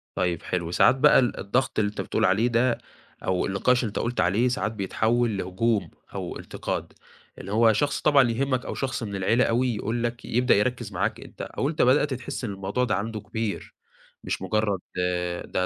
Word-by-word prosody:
طيب، 90 -3 0
حلو. 85 -2 -2
ساعات 110 - +5
بقى 130 - +6
ال 125 -2 0
الضغط 125 +6 0
اللي 105 -1 +2
أنت 105 - -5
بتقول - - 0
عليه 100 +6 +3
ده، 120 +1 +2 0.5
أو 95 -1 0
النقاش 120 +6 +2
اللي - - 0
أنت 105 - -4
قُلت 120 +1 -1
عليه، 105 +8 +2
ساعات 125 -3 -1
بيتحوَّل 110 +2 0
لهجوم 100 +2 0 0.3
أو - - -4
انتقاد. - - -5 0.4
اللي 95 - -8
هو، 110 +1 +5
شخص 145 +6 0
طبعًا 140 -5 +5
يهمَّك، 130 +1 -1
أو - - -4
شخص 130 -3 -2
من 100 -3 -4
العيلة 110 +6 +2
أوي 120 +1 +1
يقول 115 +3 -2
لك 120 0 -3
يبدأ 125 +3 +3
يركِّز 120 0 0
معاك 90 +1 -1
أنت، - - -11
أو 140 - -2
أنت 155 - -1
بدأت 130 +3 +4
تحِس 130 +2 -5
إن 115 - -2
الموضوع 100 +5 -2
ده 125 - +1
عنده 110 +3 -3
كبير، 110 0 -4 0.5
مش - - -3
مجرد 100 0 0 0.7
ده 90 - -1
115 Hz, 190 wpm, -25 LUFS, 100-125 Hz, 0.7 s, بقى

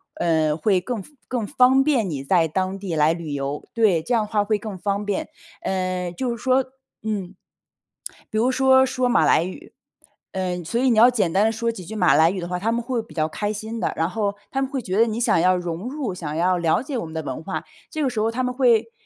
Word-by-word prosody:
呃， 160 -2 +1
会 185 +1 +2
更 230 +2 -4
方 295 - -16 0.2
更 235 -5 -2
方 255 +3 +4
便 260 -9 +1
你 140 -3 -4
在 165 0 +3
当 190 +3 -1
地 195 -3 -5
来 155 +1 +3
旅 165 -3 -6
游， 140 +1 -3
对， 215 -8 +3
这 245 - -2
样 220 -2 +2
的 - - -10
话 210 -1 +2
会 210 +1 +1
更 205 -2 -7
方 200 +2 -2
便。 210 +10 -2 0.3
嗯， 185 -2 -2
就 245 +6 -2
是 235 - -12
说 260 0 +3 0.4
嗯， 200 -4 -3 0.9
比 215 - -3
如 245 +4 +3
说 265 0 +5
说 255 -1 0
马 165 -10 +3
来 165 - +4
语， 290 - -9 0.6
嗯， 180 -2 -3
所 235 +7 -1
以 265 - +3
你 230 - +2
要 235 +3 +8
简 210 -9 +1
单 200 +4 +3
地 225 - +2
说 230 +1 -1
几 190 -6 -9
句 220 - -7
马 180 -4 +4
来 160 +1 +5
语 190 - -4
的 175 - -5
话， 180 0 -2
他 225 +4 0
们 235 - 0
会 240 -1 -2
比 225 - -15
较 155 -1 0
开 205 +6 -2
心 220 +2 -5
的， - - -1
然 165 +2 0
后 205 -1 -1 0.2
他 270 - -1
们 270 - -1
会 270 -2 -3
觉 190 -2 -3
得 230 - +6
你 225 +2 -2
想 230 - +3
要 185 +2 +4
融 175 +4 -4
入， 270 -8 -3
想 160 -4 -5
要 180 +2 +2
了 165 +3 +2
解 270 -1 -4
我 225 - -3
们 160 - -9
的 160 -1 -3
文 130 +1 -5
化。 190 +3 -4 0.3
这 310 - -3
个 265 - +2
时 240 - -3
候 220 +1 +2
他 255 +2 -2
们 250 - -1
会 235 -3 +3
205 Hz, 275 characters per minute, -23 LUFS, 175-240 Hz, 0.9 s, 要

